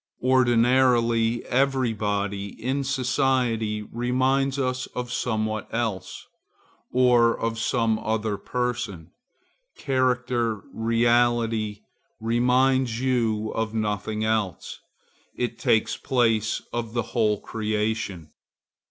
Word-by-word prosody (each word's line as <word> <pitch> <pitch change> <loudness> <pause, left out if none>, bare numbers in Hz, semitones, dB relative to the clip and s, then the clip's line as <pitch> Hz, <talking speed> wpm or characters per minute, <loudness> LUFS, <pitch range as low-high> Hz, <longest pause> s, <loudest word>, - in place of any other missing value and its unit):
Ordinarily, 120 -2 +3
every 130 -2 +1
body 100 -1 -2
in 135 +3 -1
society 125 -5 0
reminds 130 +4 0
us 130 -1 -1
of 125 -1 -4
somewhat 110 -2 -2
else, 110 -6 -3 0.7
or 120 -2 +4
of 115 0 -2
some 115 -1 +1
other 110 -1 -1
person. 120 -9 -3 0.7
Character, 125 -5 0
reality, 115 -2 +1 0.4
reminds 125 +1 +2
you 115 -4 0
of 110 0 -3
nothing 105 0 -2
else; 110 -8 -2 0.6
it 120 -2 -3
takes 110 - +2
place 115 -4 +1
of 115 -2 -3
the 120 -1 0
whole 105 -4 +2
creation. 105 -6 -3
115 Hz, 90 wpm, -25 LUFS, 110-125 Hz, 0.7 s, or